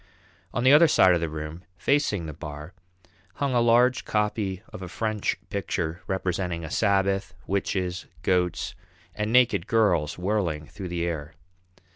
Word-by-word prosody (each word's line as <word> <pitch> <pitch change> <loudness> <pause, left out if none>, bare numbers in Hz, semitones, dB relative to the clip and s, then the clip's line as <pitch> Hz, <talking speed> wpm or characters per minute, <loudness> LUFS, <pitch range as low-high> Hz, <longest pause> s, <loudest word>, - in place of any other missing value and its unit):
On 120 - -2
the 130 +2 +7
other 160 +3 +8
side 95 - +5
of 85 - +1
the 85 - -1
room, 75 +2 -6 0.2
facing 110 - +1
the 75 - -6
bar, 75 +3 -8 0.6
hung 140 -2 -1
a 120 - +3
large 120 +2 +4
copy 105 -3 -1
of - - -8
a 90 - -5
French 110 +3 -1
picture 90 -4 -2
representing 90 -3 -2
a 75 - -8
Sabbath, 100 -2 +1
witches, 95 -2 -2 0.2
goats, 90 -1 0 0.4
and 105 +1 -2
naked 125 -7 +4
girls 90 -10 +2
whirling 90 -5 -1
through 95 +3 -8
the 85 -1 -2
air. 80 -3 -4
95 Hz, 150 wpm, -26 LUFS, 85-110 Hz, 0.6 s, other